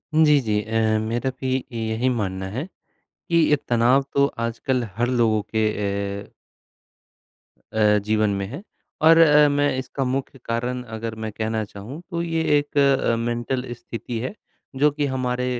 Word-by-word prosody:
जी, 150 -2 +6
जी 105 -1 +1
अ, 110 -1 +1
मेरा 115 +4 -1
भी 130 0 0 0.2
यही 115 +2 -1
मानना 95 -5 -2
है, 135 +5 -2 0.6
कि 170 - +3
ये 155 -2 +5
तनाव 120 +3 +3
तो 140 0 +4 0.2
आजकल 120 +2 -1
हर 120 +1 +1
लोगों 115 -4 +2
के 110 +1 0
ए 100 -1 -3 1.4
अ, 105 -1 +4
जीवन 110 0 +2
में 100 - -2
है। 140 - -7 0.4
और 165 +1 +7
अ, 150 -2 +7
मैं 145 -2 +1
इसका 135 +1 -3
मुख्य 135 +1 -3
कारण 120 +2 -2
अगर 115 0 -5
मैं 110 - -4
कहना 110 0 -2
चाहूँ, 105 +10 -9
तो 170 -2 -2
ये 165 -1 -1 0.2
एक 145 0 -3
अ 135 -4 +3
मेंटल 120 +2 -2
स्थिति 120 0 -6
है, 130 - -4 0.4
जो 145 +2 +3
कि 145 0 -1
हमारे 125 -1 -1
120 Hz, 160 wpm, -23 LUFS, 110-140 Hz, 1.4 s, और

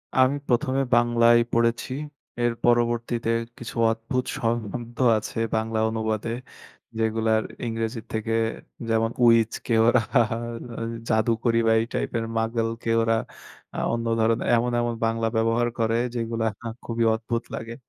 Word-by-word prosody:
আমি 130 +1 +4
১ম 130 +2 +1
এ - - +2
বাংলায় 120 0 +5 0.2
পড়েছি 115 +2 +1 0.5
এর 120 -1 +2
পরবর্তীতে 120 -1 +1 0.3
কিছু 120 +1 -8 0.2
অদ্ভুত 115 +3 -2
শ - - -6 0.3
শব্দ 120 -1 -7 0.2
আছে 105 - -6 0.2
বাংলা 110 0 -1
অনুবাদে, 110 0 -2 0.7
যেগুলার 110 0 +1 0.2
ইংরেজির 115 0 -3
থেকে 110 +1 -2 0.6
যেমন, 115 0 +2
উইচকে 115 0 +3
ওরা 120 +1 +5 1.1
জাদুকরি 115 +1 +2
বা 115 - +5
এই 115 - -1
টাইপের, 115 -1 -1
মাগলকে 115 0 -1
ওরা 115 0 +2 0.6
আ - - -5
অন্য 115 0 -2
ধরনের 115 +1 +1
এমন, 120 +1 +1
এমন 120 0 -1
বাংলা 115 0 0
ব্যবহার 115 +1 +2
করে, 115 0 +1 0.2
যেগুলো 115 -1 -2 0.4
খুবই 115 0 -1
অদ্ভুত 115 +1 -2
লাগে। 115 +1 -5
115 Hz, 130 wpm, -25 LUFS, 115-120 Hz, 1.1 s, বাংলায়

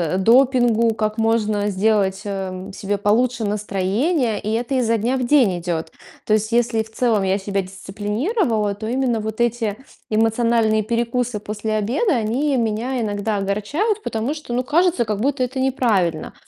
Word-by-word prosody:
э, - - +1
допингу, 235 +1 +4
как 215 0 -2
можно 215 -2 +1
сделать, 195 0 +1
эм, 190 -1 -5
себе 200 +1 -2
получше 225 +3 +1
настроение, 210 - 0
и 215 - -4
это 235 +4 -1
изо 230 -3 +2
дня 235 +5 0
в 255 - -1
день 240 -10 +3
идет. 165 -2 -4 0.3
То 215 - +1
есть, 215 +1 +1
если 235 -1 +2
в 220 - -18
целом, 220 -3 +1
я 190 0 +1
себя 200 0 -2
дисциплинировала, 210 - -2
то 215 +2 -7
именно 245 -3 0
вот 220 +1 -5
эти 235 -3 0 0.3
эмоциональные 225 0 +2
перекусы 235 0 -1
после 210 +1 -3
обеда 250 - +1
они 255 +6 0
меня 235 +3 -1
иногда 205 -1 -1
огорчают, 245 - -1
потому 225 +6 -2
что, 300 -5 -7
ну, 245 - +1
кажется, 335 -2 +2
как 210 -1 -2
будто 275 +1 +1
это 260 +1 -3
неправильно. 220 - 0
220 Hz, 160 wpm, -21 LUFS, 205-245 Hz, 0.3 s, допингу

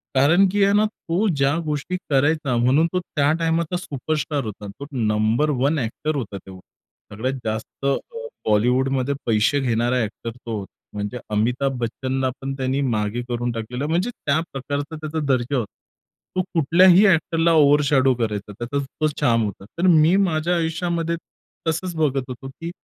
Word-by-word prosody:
कारण 165 +9 +5
की 205 0 +2
आहे 200 0 +4
ना, 210 +1 +4
तो 210 -1 -2
ज्या 140 -5 +2
गोष्टी 150 +4 -2
करायचा 145 -1 +2
म्हणून 130 +7 +3
तो 185 - +2
त्या 145 -4 0
टाईमाचा 165 +1 0
सुपरस्टार 150 -3 -2
होता. 105 -1 -7
तो 100 +8 -9
नंबर 110 +4 +1
1 145 +3 +2
ॲक्टर 140 +6 -2
होता 110 -8 -4
तेव्हा. 95 -1 -12 0.5
सगळ्यात 130 +6 -1
जास्त 110 +4 -4
अ, 140 - +3 0.5
बॉलिवूडमध्ये 130 +5 +2
पैसे 115 +5 +2
घेणारा 120 -1 +1
एक्टर 115 +2 -5
तो 115 -3 -5
होता. 100 - -9 0.2
म्हणजे 105 +4 -4
अमिताभ 125 +5 0
बच्चनला 130 +3 -1
पण 135 0 -3
त्याने 135 +1 -1
मागे 110 -2 -1
करून 120 0 -1
टाकलेलं, 120 +4 -4
म्हणजे 175 +8 0
त्या 145 -9 0
प्रकारचा 145 +3 -4
त्याचा 155 0 -4
दर्जा 130 +1 +1
होता. 115 -5 -3 0.6
तो 185 - +2
कुठल्याही 175 +5 +6
एक्टरला 165 -2 +3
ओव्हरशॅडो 145 -3 +4
करायचा, 105 -3 -3
त्याचा 120 +7 -4 0.2
तो 155 - +4
चार्म 120 -6 +1
होता. 100 -1 -6
तर 185 - +3
मी 165 0 +5
माझ्या 175 -3 +1
आयुष्यामध्ये 170 0 -1 0.5
तसंच 170 +2 -1
बघत 140 -4 +1
होतो, 125 +1 -7
की 165 +5 -7
140 Hz, 160 wpm, -22 LUFS, 120-160 Hz, 0.6 s, कुठल्याही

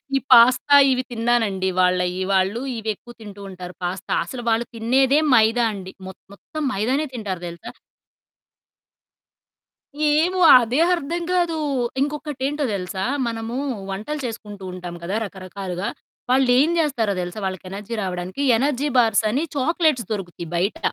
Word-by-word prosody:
ఈ - - +3
పాస్తా 255 +4 +7 0.2
ఇవి 255 0 0
తిన్నానండి 225 -5 0
వాళ్ళయి. 180 0 +1
వాళ్ళు 190 +4 +1 0.2
ఇవెక్కువ 220 +2 -5
తింటూ 205 -1 -10
ఉంటారు 180 -1 -9
పాస్తా. 185 +2 -4
అసలు 255 - -7
వాళ్ళు 225 +1 +1
తినేదే 260 +5 +3 0.2
మైదా 225 +2 +4
అండి. 190 -2 -8 0.2
మొత్ 190 - -10
మొత్తం 310 +9 -8
మైదానే 255 +10 0
తింటారు 200 -7 -4
తెలుసా? 170 0 -9 2.4
ఏమో! 340 +5 +2 0.2
అదే 240 +4 0 0.2
అర్థం 340 +2 -4
కాదు. 345 -3 +1 0.4
ఇంకొకటేంటో 295 0 -2
తెలుసా? 190 0 -4 0.2
మనము 230 0 -4 0.4
వంటలు 220 +11 -4
చేసుకుంటూంటాం 190 -6 -7
కదా! 185 +4 -3
రకరకాలుగా, 190 -1 -5 0.4
వాళ్ళేం 260 +3 +4
జేస్తారో 240 -10 0
తెలుసా? 175 +4 -5
వాళ్ళకి 190 -1 -5
ఎనర్జీ 205 +3 -7
రావడానికి, 185 +7 -4
ఎనర్జీ 280 +3 0
బార్స్ 225 -2 +3
అని 275 +7 0
చాక్లేట్స్ 305 -3 +1
దొరుకుతాయి 175 -4 -6
బయట. 185 +5 -1
225 Hz, 125 wpm, -22 LUFS, 190-265 Hz, 2.4 s, పాస్తా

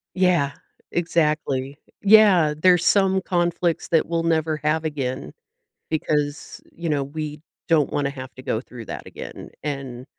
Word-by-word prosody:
Yeah. 175 -7 +2 0.4
Exactly. 150 -5 0 0.3
Yeah. 200 -7 +6
There's 175 +1 +4
some 190 -1 +4
conflicts 175 -1 0
that 165 -2 +3
we'll 165 0 -1
never 160 -2 +1
have 155 +1 +1
again 130 - -3 0.6
because, 150 -2 -2
you 170 0 -6
know, 145 -3 +1
we 150 +1 -6 0.3
don't 155 -4 +3
wanna 140 -1 0
have 130 -2 -9
to 130 - -11
go 110 - -1
through 120 -3 -11
that - - -7
again, - - -9
and 135 -4 -5
155 Hz, 140 wpm, -23 LUFS, 140-170 Hz, 0.6 s, Yeah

